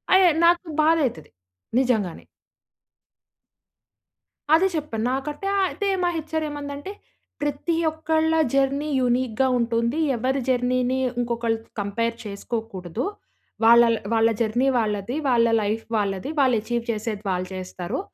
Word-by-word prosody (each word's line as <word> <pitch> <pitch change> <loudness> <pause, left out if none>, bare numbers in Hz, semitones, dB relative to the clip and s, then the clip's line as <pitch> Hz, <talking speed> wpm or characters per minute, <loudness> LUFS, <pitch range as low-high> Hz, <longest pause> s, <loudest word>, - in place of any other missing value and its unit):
I - - +7
ఏ - - +3
నాకు 345 +1 +4 0.2
బాధ 325 +1 +4
అయితది 160 -10 -9 0.5
నిజంగానే. 220 -9 0 2.3
అదే 360 +4 +5
చెప్పాను. 255 -8 -3
నాకంటే 295 +7 -3 0.2
అయితే 405 - -3 0.2
మా 350 - +3
హెచ్ఆర్ 315 0 -3
ఏమందంటే, 290 +4 -6 0.5
"ప్రతి 290 +3 -1 0.2
ఒక్కళ్ళ 315 0 0 0.2
జర్నీ 275 +2 +1
యూనిక్‌గా 250 0 +1
ఉంటుంది. 235 +4 0 0.2
ఎవరి 260 +4 0
జర్నీని 250 0 +1 0.2
ఇంకొకళ్ళు 230 -1 -1 0.2
కంపేర్ 230 +3 -1
చేసుకోకూడదు. 200 - -4 0.6
వాళ్ళళ్ 235 0 +6 0.2
వాళ్ళ 225 0 +4
జర్నీ 235 +4 +1
వాళ్ళది. 210 +2 -2
వాళ్ళ 235 -2 +4 0.2
లైఫ్ 215 +2 -2
వాళ్ళది. 200 +3 -2
వాళ్ళు 255 -4 +4
అచీవ్ 235 +1 -2
చేసేది 215 -1 -4
వాళ్ళు 180 0 -2
చేస్తారు. 185 - -5
240 Hz, 115 wpm, -24 LUFS, 220-290 Hz, 2.3 s, I